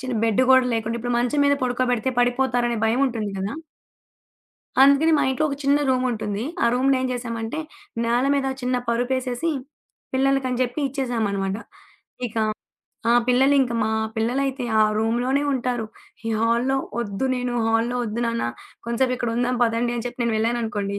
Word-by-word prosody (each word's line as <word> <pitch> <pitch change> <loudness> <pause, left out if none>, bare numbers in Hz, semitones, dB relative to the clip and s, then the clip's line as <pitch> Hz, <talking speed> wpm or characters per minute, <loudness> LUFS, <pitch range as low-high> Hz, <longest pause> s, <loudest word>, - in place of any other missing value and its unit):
చిన్న 255 -1 -3
బెడ్ 225 +2 +2
గూడా 260 -1 +6
లేకుండా 225 +1 -2
ఇప్పుడు 245 +1 -2
మంచం 250 +4 +1
మీద 285 0 +4
పడుకోబెడితే 250 -1 0
పడిపోతారనే 245 -1 +1
భయం 235 +4 +1
ఉంటుంది 225 -5 -3
గదా! 200 +9 -3 1.3
అందుకని 280 +4 +5
మా - - +2
ఇంట్లో 285 +4 0
ఒక 280 - -3
చిన్న 285 +1 +4
రూముంటుంది. 230 -5 -1 0.2
ఆ - - +4
రూమునేం 260 0 +2
చేశామంటే, 230 +2 -4 0.5
నేల 240 +2 +2
మీద 275 -1 0 0.2
చిన్న 250 0 0
పరుపేసేసి 250 +5 0 0.6
పిల్లలకని 265 -2 +1
చెప్పి 250 +4 -2
ఇచ్చేసామనమాట. 220 -7 -1 0.7
ఇక 230 - -11 0.7
ఆ - - +6
పిల్లలు 265 +3 +4
ఇంకా 240 -2 -2
మా 220 - 0 0.3
పిల్లలైతే 255 +3 -1 0.2
ఆ - - +7 0.2
రూమ్‌లోనే 245 +5 +1
ఉంటారు. 245 -3 -1 0.4
ఈ - - -1
హాల్‌లో 235 +4 +2 0.2
వద్దు, 205 +2 -3
నేను 250 -1 -2
హాల్‌లో 230 +2 +1
వద్దు, 225 +1 -3
నాన్న 230 - -1 0.4
కొంసేపు 250 +2 +1
ఇక్కడ 240 -2 -2
ఉందాం 245 +1 +1
పదండి 230 +1 0
అని 235 - -4
చెప్పి 245 0 -7
నేను 235 -2 0
వెళ్లాననుకోండి. 220 -3 -1
245 Hz, 150 wpm, -23 LUFS, 230-260 Hz, 1.3 s, ఆ